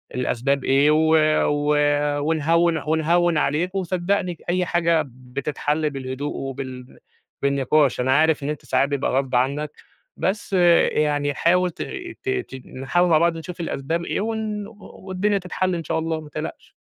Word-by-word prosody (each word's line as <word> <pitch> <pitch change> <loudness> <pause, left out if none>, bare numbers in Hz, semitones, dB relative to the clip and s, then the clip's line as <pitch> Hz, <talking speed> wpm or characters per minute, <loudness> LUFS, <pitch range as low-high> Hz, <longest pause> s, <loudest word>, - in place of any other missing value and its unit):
الأسباب 130 +2 0
إيه 140 +3 +4
و 160 +1 +3 0.3
و 145 0 +1 0.4
ونهوّن، 165 +2 +2
ونهوّن 165 +1 +2
عليك، 165 +6 0
وصدّقني 185 0 -1
ج 165 - -18
أي 180 +1 +1
حاجة 170 -2 +2
بتتحل 140 +4 -3
بالهدوء 135 +1 -5
وبالن 130 -2 -7 0.4
بالنِقاش. 140 +1 +2
أنا 130 +2 +3
عارف 155 -2 +2
إن 140 - -2
أنت 150 -2 -5
ساعات 130 +2 +1
بيبقى 140 -1 -1
غصب 135 -1 0
عنّك، 140 +4 0 0.5
بس 200 +1 -2 0.4
يعني 145 -1 0
حاول 180 +5 +2
ت - - -10 0.4
ت 395 - -3
تيجي 370 - -4
نحاول 175 +7 +1
مع 160 - +5
بعض 170 0 +2
نشوف 170 +2 -8
الأسباب 165 +1 -2
إيه - - -2
و 225 +2 -1
ن 210 -2 -4
و 225 - -15 0.3
والدنيا 195 +2 0
تتحل 185 0 -2
إن 165 - -4
شاء 160 +1 -1
الله، 160 0 -2
ما 150 - -12
تقلقش. 155 +2 -7
155 Hz, 160 wpm, -22 LUFS, 140-175 Hz, 0.5 s, مع